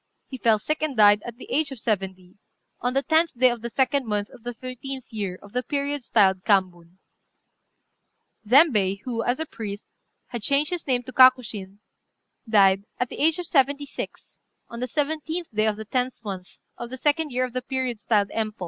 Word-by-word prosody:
He 260 - -8
fell 225 -2 +4
sick 305 +9 -2
and 300 -5 -2
died, 205 -1 +6
at 235 -1 -8
the - - -10
age 310 0 +1
of 265 - -7
seventy, 190 -4 -3 0.4
on 245 +2 -1
the 275 - +2
10th 320 -3 +2
day 255 0 +5
of 240 -2 -5
the 235 - -4
2d 265 +3 +1
month 210 -3 -2
of - - -15
the 245 +2 -5
13th 255 +2 -7
year 200 -4 -3
of 205 - -15
the 250 - 0
period 285 0 -3
styled 190 -5 +3
Kambun. 180 -4 0 1.5
Zembei, 210 - +4
who, 235 -3 -3
as 245 +4 -1
a 320 - -2
priest, 205 -7 -7 0.4
had 240 -2 -5
changed 280 - +1
his 350 -3 -4
name 250 -2 +1
to 255 - -10
Kakushin, 220 -7 +4 0.7
died, 195 -2 +4
at 250 - -1
the - - -8
age 320 +1 +3
of 355 - -4
seventy 285 -1 +2
six, - - -8 0.3
on 235 - -8
the 250 - -2
17th 315 +3 -3
day 215 +1 +2
of 215 - +1
the 220 +1 -8
10th 250 +3 -1
month 190 -3 -7 0.2
of 240 - -6
the 260 - -7
2d 300 +3 +1
year 255 -1 0
of 250 - -9
the 255 - -2
period 255 -3 -3
styled 205 -2 +1
Empô. 215 -1 -3
245 Hz, 200 wpm, -24 LUFS, 210-275 Hz, 1.5 s, died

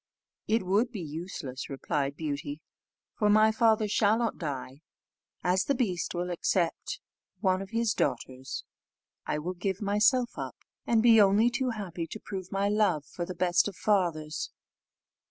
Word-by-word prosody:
"It 225 0 +2
would 205 +7 +2
be 220 - -5
useless," 155 -5 -6
replied 140 0 -2
Beauty, 145 -1 -4 0.6
"for 210 - +3
my 215 +1 +6
father 220 -2 +3
shall 210 +1 +3
not 230 -1 -1
die. 140 -3 -5 0.6
As 185 +1 +2
the 280 - +1
beast 185 -9 -1
will 175 +1 -2
accept 175 0 -1 0.4
of 195 - -30
one 185 -1 +3
of 195 - -7
his 230 0 +1
daughters, 130 +2 -2 0.6
I - - 0
will 170 +5 -3
give 190 +1 -2
myself 215 +5 +2
up, - - -5 0.3
and 225 -1 +3
be 230 -2 +8
only 205 +4 +5
too 255 +2 0
happy 185 -7 -4
to 215 - -7
prove 190 -3 -7
my 195 +1 +1
love 205 -8 +2
for 175 -1 -5
the 185 - -5
best 175 +1 +3
of 200 - -6
fathers." 170 -8 0
190 Hz, 160 wpm, -29 LUFS, 165-215 Hz, 0.6 s, be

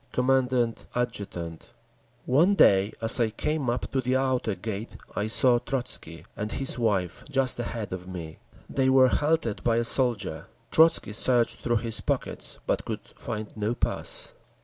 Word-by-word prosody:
Commandant 125 -2 +1
Adjutant 100 -9 -4 0.6
One 165 +10 +4
day 100 - +5
as 115 +3 +6
I 115 -2 +2
came 145 +4 -2
up 120 +1 -2
to 135 - 0
the 130 +1 0
outer 130 -5 0
gate 110 +1 -6 0.2
I 105 - -1
saw 120 +2 +5
Trotzky 120 - -4
and 105 +1 -4
his 135 -2 -1
wife 100 -7 -1
just 135 -3 +1
ahead 115 -4 -4
of 90 0 -7
me. 85 -4 -8 0.3
They 130 -1 +1
were 130 -1 +6
halted 150 -8 0
by 115 -1 +2
a 115 - +2
soldier. 110 - 0 0.2
Trotzky 160 -9 +4
searched 120 +1 +1
through 120 0 0
his 115 -1 0
pockets, - - -3
but - - 0
could - - -5
find 110 -1 -6
no 110 +2 -1
pass. - - -1
120 Hz, 155 wpm, -26 LUFS, 105-130 Hz, 0.6 s, as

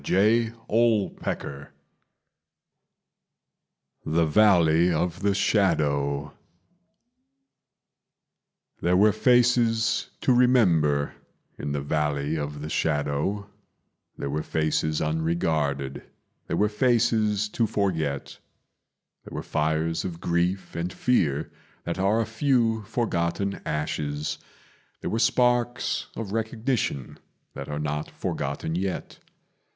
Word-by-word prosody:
The 110 +8 +3 0.3
Three 115 -3 +3
Taverns 70 0 -4 2.4
The 80 +1 +2
Valley 85 -2 +4
of 85 +1 -1
the 100 -1 +2
Shadow 70 -9 +1 2.5
There 90 +1 +3
were 105 +2 +6
faces 115 0 +3
to 130 - +3
remember 90 - +3 0.5
in 70 0 -3
the 70 -1 -2
Valley 75 0 -1
of 75 -1 -4
the 75 - -5
Shadow, 75 +7 -1 0.7
There 70 - -4
were 75 +2 -1
faces 80 -1 0
unregarded, 75 -4 -1 0.5
there - - -1
were 105 - +3
faces 110 -2 +2
to 115 +1 0
forget; 80 -10 -2 0.8
There - - -10
were - - -4
fires 80 +2 0
of 85 -3 -5
grief 85 +2 -1
and 85 +2 -2
fear 80 - 0 0.3
that 85 +2 -4
are 100 +4 +2
a 115 - +1
few 115 -1 +1
forgotten 100 -4 -1
ashes, 75 -1 -2 0.6
There - - -3
were 110 - 0
sparks 120 0 +1
of 110 -4 -5
recognition 110 - -2 0.3
that - - -7
are 75 - -3
not 75 0 -3
forgotten 80 - -3
yet. 95 +2 -3
90 Hz, 105 wpm, -26 LUFS, 75-110 Hz, 2.5 s, were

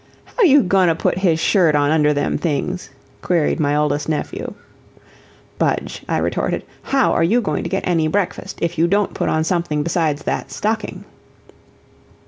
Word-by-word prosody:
"How - - 0
you 290 - +6
goin' 185 -1 +3
to 165 - +2
put 170 - 0
his 170 -4 +2
shirt 165 -2 +3
on 145 0 +2
under 150 -1 +3
them 145 -1 0
things?" 175 +3 -2 0.3
queried 170 -2 +1
my 145 -1 +1
oldest 150 0 0
nephew. 155 - -3 1.0
"Budge," - - -1
I - - +1
retorted, - - -1 0.2
"how 270 -2 +1
are - - +2
you 215 +9 +3
going 220 - -2
to - - -4
get 195 - -2
any 165 -3 +2
breakfast 185 +3 -2
if 170 0 -2
you 170 - +4
don't 200 +2 +1
put - - -1
on 155 - +1
something 165 -3 -1
besides 160 -2 -1
that - - -3
stocking?" 215 0 -3
170 Hz, 170 wpm, -19 LUFS, 155-195 Hz, 1.0 s, you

